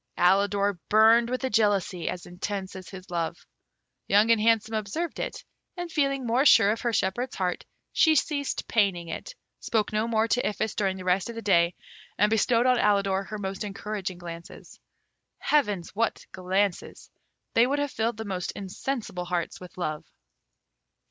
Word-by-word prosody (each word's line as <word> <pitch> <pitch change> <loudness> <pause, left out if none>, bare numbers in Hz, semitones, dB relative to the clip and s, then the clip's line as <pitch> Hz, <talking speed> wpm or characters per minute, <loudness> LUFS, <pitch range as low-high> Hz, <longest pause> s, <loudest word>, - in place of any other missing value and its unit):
Alidor 200 +1 +2
burned 225 +2 +5
with 255 +1 -3
a 260 - 0
jealousy 200 -5 +1
as 180 - -5
intense 190 +2 -5
as 185 -2 -9
his 185 -1 -11
love. 170 0 -3 0.6
Young 210 +3 +4
and 225 -2 +4
Handsome 225 0 +2
observed 220 +11 -3
it, - - -4 0.3
and 350 -1 -5
feeling 275 -4 0
more 240 +3 +2
sure 225 -8 +6
of 225 - -3
her 240 - 0
shepherd's 235 +5 -1
heart, 180 -2 -2 0.3
she 315 -1 +5
ceased 285 -2 -1
paining 190 -6 +1
it, - - -6 0.2
spoke 215 -2 -1
no 215 +2 +1
more 225 -1 +1
to 245 - +2
Iphis 210 0 -1
during 190 -2 -1
the 185 - -8
rest 185 +4 +1
of 235 - -6
the 230 - -6
day, 175 -3 +3 0.4
and 210 +1 +3
bestowed 230 +2 +3
on 250 -1 +4
Alidor 195 -1 +2
her 215 +2 -6
most 195 0 -4
encouraging 200 -2 -5
glances. 170 -1 -10 0.6
Heavens! 205 - 0
what 225 +2 -1
glances! 190 +1 -2 0.4
they 230 +2 +5
would 280 +2 0
have 290 -1 -1
filled 225 0 -1
the 220 - -5
most 185 -3 -3
insensible 200 -1 -4
hearts 175 -1 -3
with 180 0 -12
love. 155 -4 -3
205 Hz, 170 wpm, -27 LUFS, 185-230 Hz, 0.6 s, sure